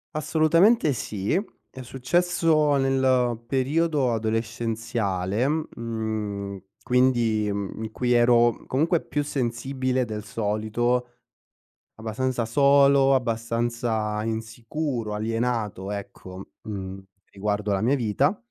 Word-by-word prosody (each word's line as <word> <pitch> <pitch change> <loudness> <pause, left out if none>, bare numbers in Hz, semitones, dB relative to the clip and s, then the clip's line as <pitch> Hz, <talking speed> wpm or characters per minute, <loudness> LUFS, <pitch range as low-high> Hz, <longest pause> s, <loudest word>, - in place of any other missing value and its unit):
Assolutamente 160 +5 +3
sì 105 -5 -3 0.4
è 130 - -10
successo 155 +3 +2
nel 130 -3 +2
periodo 140 +1 +1
adolescenziale, 115 -2 -1
mhmm, 110 -8 -3 0.2
quindi, 120 -4 +2
uhm, 100 +1 -4
in 110 -1 -5
cui 125 -1 -1
ero 120 -1 +4
comunque 160 +6 +2
più 145 -1 -2
sensibile 130 -1 -1
del 110 -3 -5
solito 110 +3 -1 0.9
abbastanza 120 +3 -2
solo, 140 +2 +5
abbastanza 115 -2 -1
insicuro, 115 +2 -3
alienato, 110 -3 -2
ecco, 95 -2 -8 0.2
mhmm, 95 -2 -6 0.3
riguardo 105 +1 -2
la 95 - +1
mia 120 +6 +2
vita 135 - +1
120 Hz, 95 wpm, -25 LUFS, 110-135 Hz, 0.9 s, solo